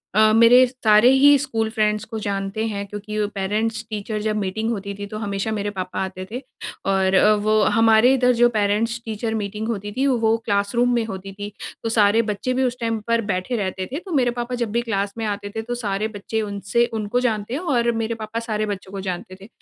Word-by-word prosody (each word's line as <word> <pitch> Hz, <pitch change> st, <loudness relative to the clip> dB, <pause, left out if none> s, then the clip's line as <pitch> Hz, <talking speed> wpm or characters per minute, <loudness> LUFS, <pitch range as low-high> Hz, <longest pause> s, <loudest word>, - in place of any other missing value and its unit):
अ, 215 Hz, 0 st, +6 dB
मेरे 230 Hz, +3 st, +7 dB
सारे 230 Hz, -2 st, +4 dB
ही 285 Hz, +2 st, +6 dB
school 230 Hz, -5 st, -2 dB
friends 215 Hz, -2 st, 0 dB
को 225 Hz, 0 st, -6 dB
जानते 200 Hz, +2 st, -2 dB
हैं। 200 Hz, -2 st, -3 dB
क्योंकि 210 Hz, +1 st, -6 dB, 0.2 s
पेरेंट्स-टीचर 215 Hz, +1 st, -2 dB
जब 215 Hz, 0 st, -1 dB
मीटिंग 210 Hz, +3 st, -2 dB
होती 200 Hz, -2 st, -4 dB
थी 205 Hz, -, -4 dB
तो 215 Hz, +1 st, -7 dB
हमेशा 200 Hz, 0 st, -2 dB
मेरे 205 Hz, -1 st, -2 dB
पापा 185 Hz, -2 st, -5 dB
आते 185 Hz, 0 st, -6 dB
थे। 250 Hz, +3 st, -4 dB, 0.5 s
और 190 Hz, -1 st, +2 dB
अ, 210 Hz, +3 st, +6 dB
वो 215 Hz, +1 st, +2 dB, 0.2 s
हमारे 225 Hz, +3 st, +5 dB
इधर 250 Hz, -1 st, +3 dB
जो 240 Hz, 0 st, +5 dB
पेरेंट्स-टीचर 220 Hz, +1 st, -1 dB
मीटिंग 210 Hz, +1 st, -3 dB
होती 205 Hz, -2 st, -3 dB
थी 270 Hz, -, +2 dB
वो 225 Hz, -4 st, +2 dB
क्लासरूम 215 Hz, +4 st, +1 dB
में 235 Hz, -, +1 dB
होती 195 Hz, -2 st, -7 dB
थी। 205 Hz, 0 st, -5 dB, 0.3 s
तो 225 Hz, -, -1 dB
सारे 220 Hz, 0 st, +4 dB
बच्चे 210 Hz, +5 st, -2 dB
भी 260 Hz, +1 st, +1 dB
उस 250 Hz, -1 st, -1 dB
टाइम 225 Hz, -1 st, -1 dB
पर 230 Hz, 0 st, +2 dB
बैठे 185 Hz, +7 st, -2 dB
रहते 190 Hz, -2 st, -3 dB
थे। 290 Hz, -, -3 dB
तो 370 Hz, -, -8 dB
मेरे 250 Hz, -5 st, +2 dB
पापा 240 Hz, +1 st, -2 dB
जब 225 Hz, -, -1 dB
भी 235 Hz, +2 st, +1 dB
क्लास 200 Hz, -4 st, -2 dB
में 225 Hz, -, -2 dB
आते 205 Hz, -1 st, -3 dB
थे 220 Hz, -, -1 dB
तो 245 Hz, +2 st, -4 dB
सारे 210 Hz, -3 st, -2 dB
बच्चे 220 Hz, +2 st, -3 dB
उनसे 205 Hz, +3 st, 0 dB
उनको 215 Hz, +2 st, -1 dB
जानते 225 Hz, -3 st, -1 dB
हैं 275 Hz, -, -1 dB, 0.2 s
और 235 Hz, 0 st, +2 dB
मेरे 225 Hz, +1 st, -2 dB
पापा 220 Hz, +2 st, -4 dB
सारे 215 Hz, -2 st, -2 dB
बच्चों 195 Hz, -2 st, -6 dB
को 195 Hz, -, -5 dB
जानते 185 Hz, +1 st, -6 dB
थे। 200 Hz, -, -11 dB
215 Hz, 215 wpm, -22 LUFS, 205-235 Hz, 0.5 s, मेरे